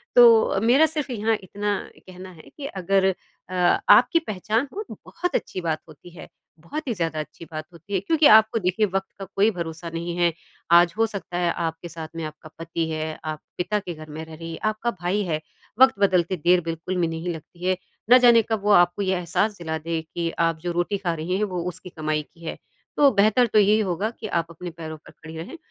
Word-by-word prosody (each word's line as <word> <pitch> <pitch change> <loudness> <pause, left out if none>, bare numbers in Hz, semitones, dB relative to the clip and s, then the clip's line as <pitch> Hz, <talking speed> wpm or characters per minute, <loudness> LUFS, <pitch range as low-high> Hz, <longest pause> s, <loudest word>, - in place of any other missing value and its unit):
तो 235 -2 +8
अ, - - 0
मेरा 245 +9 +5
सिर्फ़ 300 -4 -3
यहाँ 225 -1 +1
इतना 205 +2 -2 0.3
कहना 185 0 -10
है 160 -3 -15
कि 285 - -6
अगर 190 -1 +1 0.4
अ, 185 - -7 0.4
आपकी 335 - +7
पहचान 215 +6 -1
हो 420 - -4
तो - - -6
बहुत 355 -1 -3
अच्छी 185 - -2
बात 160 -2 -2
होती 155 +3 -14
है। - - -9 0.3
बहुत 290 - -6
ही 240 - 0
ज़्यादा 165 -5 -2
अच्छी 155 +2 -8
बात 155 -1 -5
होती 170 +5 -11
है 195 - +2
क्योंकि 305 - +4
आपको 220 +1 +4
देखिए 185 +3 +1
वक़्त 195 -1 -2
का 195 - -5
कोई 205 +3 +4
भरोसा 170 -2 -6
नहीं 170 +1 -3
है, 175 -1 +3 0.4
आज 170 0 +6
हो 225 - +4
सकता 195 -4 -6
है 175 -1 +1
आपके 165 0 -4
साथ 165 -1 -7
में 165 - -4
आपका 155 +1 -10
पति 165 0 -3
है, 155 0 -3
आप 155 -1 -4 0.2
पिता 210 +4 0
के 180 -3 -6
घर 155 -1 -11
में 155 +2 -6
रह 160 - -12
रही, 165 +1 -7
आपका 215 +2 -1
भाई 185 +4 0
है 155 -4 -2 0.4
वक़्त 265 0 +7
बदलते 185 -2 +2
देर 175 +3 +3
बिल्कुल 165 +3 -4
भी 170 - +2
नहीं 165 +2 -4
लगता 170 +2 -10
है। 185 - +3 0.3
ना 250 - +9
जाने 240 -2 +6
कब 220 - 0
वो 210 - +3
आपको 175 0 +4
ये 190 -1 +1
एहसास 190 +5 -1
दिला 160 -2 -3
दे 165 +1 -3
कि 165 +1 -4
आप 165 -1 +2
जो 175 +1 -2
रोटी 175 +4 -1
खा 180 -3 -2
रही 170 +4 -2
हैं 210 - 0
वो 185 -4 -2
उसकी 180 +1 -10
कमाई 155 -2 -2
की 165 0 -15
है। - - -4 0.4
तो 285 -1 +7
बेहतर 215 +4 +4
तो 215 - +6
यही 210 +2 +4
होगा 195 +2 -1
कि 220 - -5
आप 170 -4 -1
अपने 175 +2 -7
पैरों 160 -1 -8
पर 155 - -17
खड़ी 160 0 -11
रहें 170 - -7
180 Hz, 225 wpm, -24 LUFS, 165-210 Hz, 0.4 s, ना